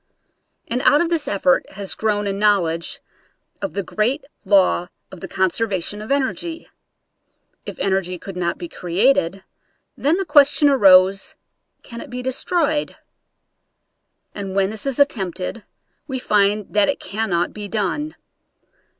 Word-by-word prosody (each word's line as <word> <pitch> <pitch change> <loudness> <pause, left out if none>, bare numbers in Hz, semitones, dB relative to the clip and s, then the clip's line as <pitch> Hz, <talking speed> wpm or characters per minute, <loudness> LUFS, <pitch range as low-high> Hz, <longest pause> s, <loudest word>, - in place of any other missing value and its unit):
And 245 +2 -2
out 290 - +5
of 345 - +1
this 325 -3 0
effort 190 -3 +1
has 195 -1 -3
grown 210 -1 -1
a 200 - -1
knowledge 195 -5 0 0.6
of 295 - -3
the 200 - -1
great 235 - -1 0.2
law 190 -3 +3 0.2
of 190 - -10
the 190 - -7
conserva 190 +1 0
tion 205 +4 -5
of 215 - -7
energy. 320 +5 -2 1.0
If - - -7
energy 190 -2 -1
could 195 +2 -9
not 175 -1 -2
be 175 - -6
created, 190 +1 +1 0.5
then 300 +5 +1
the 390 - -2
question 290 -1 +5
arose, 195 -6 +5 0.5
Can 235 -1 -9
it - - -10
be 250 +1 -6
destroyed? 295 +3 -1 1.4
And 195 -2 -6
when 195 0 +2
this 220 +4 -5
is 270 - -1
attempted 200 -6 -1 0.4
we 265 -3 -3
find 205 -3 +1
that 205 -1 +3
it - - -1
cannot 195 -3 -2
be 210 -1 -6
done. 225 +10 -2
205 Hz, 140 wpm, -21 LUFS, 190-270 Hz, 1.4 s, out